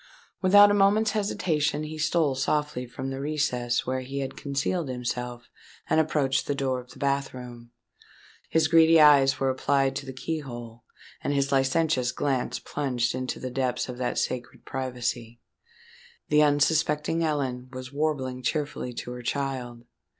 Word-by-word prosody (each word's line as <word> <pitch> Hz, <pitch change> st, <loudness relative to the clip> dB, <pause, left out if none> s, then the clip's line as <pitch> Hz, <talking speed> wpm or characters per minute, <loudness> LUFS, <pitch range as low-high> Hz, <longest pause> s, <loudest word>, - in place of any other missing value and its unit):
Without 205 Hz, +2 st, +7 dB
a -, -, +3 dB
moment's 205 Hz, +2 st, +3 dB
hesitation 155 Hz, -8 st, 0 dB
he 155 Hz, +1 st, -6 dB
stole 155 Hz, -2 st, +2 dB
softly 140 Hz, -1 st, -1 dB
from 130 Hz, +2 st, -5 dB
the 135 Hz, -, -5 dB
recess 125 Hz, -5 st, -1 dB
where 130 Hz, +1 st, -1 dB
he 135 Hz, +2 st, -6 dB
had 135 Hz, -, -5 dB
concealed 145 Hz, +3 st, -2 dB
himself, 125 Hz, -1 st, -4 dB, 0.4 s
and -, -, +3 dB
approached 140 Hz, -4 st, +1 dB
the 145 Hz, -, 0 dB
door 130 Hz, -2 st, -1 dB
of 125 Hz, 0 st, -13 dB
the -, -, -14 dB
bath 140 Hz, -1 st, -1 dB
room. 120 Hz, -2 st, -10 dB, 0.8 s
His 160 Hz, -1 st, +3 dB
greedy 165 Hz, 0 st, +6 dB
eyes 140 Hz, -3 st, +6 dB
were 135 Hz, -1 st, +2 dB
applied 135 Hz, 0 st, +1 dB
to 140 Hz, -, -6 dB
the -, -, -4 dB
key 160 Hz, +5 st, -3 dB
hole; 120 Hz, -4 st, -9 dB, 0.4 s
and 145 Hz, -, 0 dB
his 140 Hz, 0 st, +1 dB
licentious 135 Hz, -1 st, +2 dB
glance 130 Hz, -1 st, -1 dB
plunged 125 Hz, -4 st, -2 dB
into 130 Hz, 0 st, -3 dB
the 130 Hz, -, -5 dB
depths 130 Hz, -1 st, -1 dB
of 125 Hz, 0 st, -7 dB
that 125 Hz, -, -2 dB
sacred 125 Hz, -1 st, -3 dB
privacy. 120 Hz, -3 st, -4 dB, 0.9 s
The 150 Hz, 0 st, +5 dB
unsuspecting 150 Hz, +2 st, +2 dB
Ellen 130 Hz, -5 st, -2 dB
was 130 Hz, +1 st, -8 dB
warbling 140 Hz, -4 st, -1 dB
cheerfully 145 Hz, -3 st, -2 dB
to 120 Hz, -, -6 dB
her 125 Hz, 0 st, -7 dB
child. 125 Hz, -2 st, -3 dB
135 Hz, 155 wpm, -26 LUFS, 125-150 Hz, 0.9 s, Without